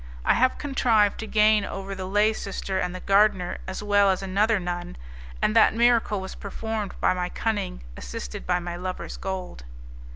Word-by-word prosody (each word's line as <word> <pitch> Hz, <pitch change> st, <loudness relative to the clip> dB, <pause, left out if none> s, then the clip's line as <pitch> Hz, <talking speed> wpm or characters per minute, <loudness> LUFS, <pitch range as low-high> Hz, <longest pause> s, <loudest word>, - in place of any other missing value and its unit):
I -, -, +5 dB
have 255 Hz, +2 st, +2 dB
contrived 230 Hz, -7 st, +2 dB
to 220 Hz, -, -5 dB
gain 215 Hz, -1 st, +4 dB
over 195 Hz, 0 st, -5 dB
the 190 Hz, -1 st, -5 dB
lay 210 Hz, +3 st, +3 dB
sister 195 Hz, -2 st, -4 dB
and 180 Hz, 0 st, -2 dB
the 185 Hz, -, -7 dB
gardener, 195 Hz, -2 st, +2 dB
as 190 Hz, +2 st, -5 dB
well 205 Hz, -1 st, +4 dB
as 190 Hz, 0 st, 0 dB
another 205 Hz, +3 st, +2 dB
nun, 175 Hz, -, -5 dB, 0.5 s
and 215 Hz, -, +2 dB
that 225 Hz, -, +5 dB
miracle 230 Hz, -3 st, +3 dB
was 190 Hz, 0 st, -7 dB
performed 215 Hz, 0 st, -5 dB
by -, -, +3 dB
my 180 Hz, -1 st, -2 dB
cunning 205 Hz, -, -3 dB
assisted -, -, -7 dB
by 180 Hz, 0 st, +2 dB
my 175 Hz, -1 st, -5 dB
lover's 180 Hz, +1 st, -5 dB
gold. 185 Hz, -, -5 dB
195 Hz, 175 wpm, -25 LUFS, 185-215 Hz, 0.5 s, I